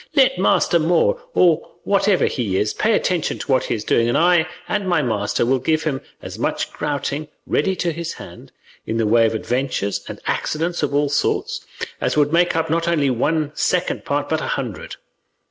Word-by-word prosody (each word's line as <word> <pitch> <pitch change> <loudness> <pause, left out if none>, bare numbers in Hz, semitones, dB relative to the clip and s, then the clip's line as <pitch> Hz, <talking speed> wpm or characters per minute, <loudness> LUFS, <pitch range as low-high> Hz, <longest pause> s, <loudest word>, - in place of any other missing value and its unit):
Let 265 - +4
master 175 -2 +3
Moor, 175 - +2
or 170 -4 +3
whatever 200 -1 +2
he 105 -8 -1
is, 105 +2 0
pay 220 +1 +1
attention 180 -6 0
to 145 - -4
what 130 - +3
he - - -1
is 105 - -5
doing, 115 +1 +2
and 120 - +2
I 175 0 +4 0.2
and 195 -2 -1
my 175 -4 +2
master 110 -2 0
will 130 +2 +2
give 155 +5 0
him 140 -4 -2 0.2
as - - -8
much - - -2
grouting 145 0 -3 0.2
ready 190 -1 +1
to 175 -2 -1
his 170 +1 -5
hand, - - -12 0.4
in 115 - -1
the 115 - +1
way 115 +1 +4
of 110 - -2
adventures 110 -4 -2
and - - -7
accidents 170 +3 -1
of 140 -1 -1
all 145 0 +2
sorts, 145 - -1 0.4
as - - 0
would 145 +1 +3
make 175 0 +3
up 160 0 +1
not 165 +1 0
only 150 -5 +2
one 150 +5 0
second - - 0
part, - - -1
but - - -1
a - - -3
hundred. - - -5
150 Hz, 195 wpm, -21 LUFS, 125-170 Hz, 0.4 s, Let